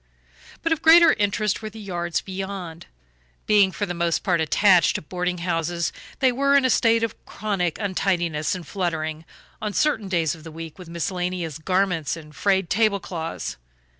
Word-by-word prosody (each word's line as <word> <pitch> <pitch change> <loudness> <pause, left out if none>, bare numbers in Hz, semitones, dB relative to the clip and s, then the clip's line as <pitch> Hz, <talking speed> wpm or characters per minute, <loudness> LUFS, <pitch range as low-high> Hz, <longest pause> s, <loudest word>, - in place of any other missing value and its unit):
But 330 - 0
of 320 -1 +1
greater 330 0 +8
interest 205 +1 0
were 215 - -5
the 220 +1 -11
yards 175 -4 -2
beyond. 190 -3 -6 0.6
Being 205 -2 +4
for 205 - -2
the 180 - -4
most 170 -1 0
part 180 -4 +1
attached 180 +2 +4
to - - -2
boarding 180 +2 -2
houses 170 -1 -1 0.3
they 260 -1 +5
were 280 +3 +3
in 275 - +3
a 260 - +3
state 230 0 +3
of 230 - -4
chronic 195 -6 -2
untidiness 180 -5 0
and 180 -2 -7
fluttering, 160 -3 -3 0.4
on 210 -1 -3
certain 225 -8 +1
days 170 -5 +1
of 160 -2 -12
the 165 - -9
week, 165 +2 -9
with 180 -2 -10
miscellaneous 175 -2 -3
garments 180 -3 0
and 150 -2 -13
frayed 195 -2 +1
table 210 +2 +2
cloths. 165 -3 -5
185 Hz, 170 wpm, -23 LUFS, 165-205 Hz, 0.6 s, greater